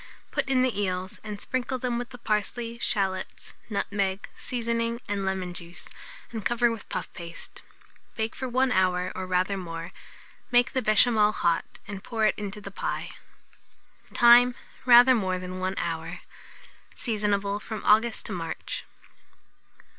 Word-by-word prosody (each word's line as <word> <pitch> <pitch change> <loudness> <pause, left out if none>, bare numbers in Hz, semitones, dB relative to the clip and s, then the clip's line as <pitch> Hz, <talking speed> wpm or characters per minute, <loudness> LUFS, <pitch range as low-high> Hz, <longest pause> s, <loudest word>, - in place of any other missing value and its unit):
Put - - 0
in 255 -1 +4
the 235 -6 +1
eels, 185 -1 -2
and 210 -2 -6
sprinkle 255 +2 -2
them 245 -1 -1
with 245 - -5
the 250 - -10
parsley, 230 +1 -2
shalots, 190 -4 -2 0.2
nutmeg, 200 -2 -1
seasoning, 235 -1 -2
and 200 -1 -1
lemon 185 -2 -2
juice, 175 0 -7 0.4
and 225 -3 -5
cover 240 +1 +3
with 225 -2 -7
puff - - -4
paste. 170 -1 -9 0.5
Bake 220 0 -2
for 260 0 -4
1 255 +1 +2
hour, 185 -2 +2
or 185 0 -5
rather 185 +2 +1
more; 165 -2 -6 0.6
make 245 0 +4
the 260 - +1
béchamel 215 -1 +4
hot, 170 -1 +1 0.2
and 200 -1 -6
pour 225 -3 0
it 215 - +4
into 205 0 -5
the 200 -1 -8
pie. - - -3 1.0
Time. 240 0 +7 0.3
Rather 245 +1 +9
more 190 -6 0
than 185 0 -6
1 185 +1 -1
hour. 165 +1 -3 0.7
Seasonable 205 -3 0
from 215 0 -6
August 220 +2 +4
to - - -5
March. 165 -3 -4
210 Hz, 145 wpm, -27 LUFS, 185-235 Hz, 1.0 s, Rather